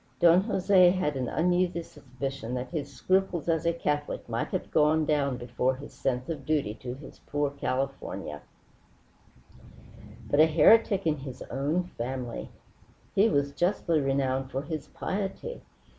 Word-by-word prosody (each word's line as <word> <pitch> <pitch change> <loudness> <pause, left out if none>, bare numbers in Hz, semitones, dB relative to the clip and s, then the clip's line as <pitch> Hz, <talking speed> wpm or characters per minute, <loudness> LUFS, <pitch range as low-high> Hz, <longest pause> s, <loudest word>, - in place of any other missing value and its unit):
Don 170 +1 +6
Jose 190 -4 +5
had 175 -5 0
an 130 -2 -2
uneasy 175 0 +1
suspicion 135 -3 -6
that 125 +1 -4
his 145 -4 -4
scruples 185 +5 0
as 165 -1 +1
a - - +4
Catholic 150 -3 -2
might - - -2
have - - -4
gone 155 +1 +3
down 140 -4 +1
before 125 +2 -1
his 140 +3 -11
sense 125 -1 -2
of 155 -5 -4
duty 140 -7 0
to 125 0 -5
this 140 - -12
poor 145 -1 0
California. 135 -1 -3 1.9
But 145 - +1
a 155 - +8
heretic 195 +5 +5
in 155 -2 +2
his 135 -2 -8
own 145 +7 0
family! 125 -6 -5 0.6
He 205 +3 +4
was 140 -1 +1
justly 175 -2 +1
renowned 135 -1 0
for 135 +1 -3
his 155 -2 -5
piety. 205 - -4
145 Hz, 145 wpm, -28 LUFS, 135-170 Hz, 1.9 s, a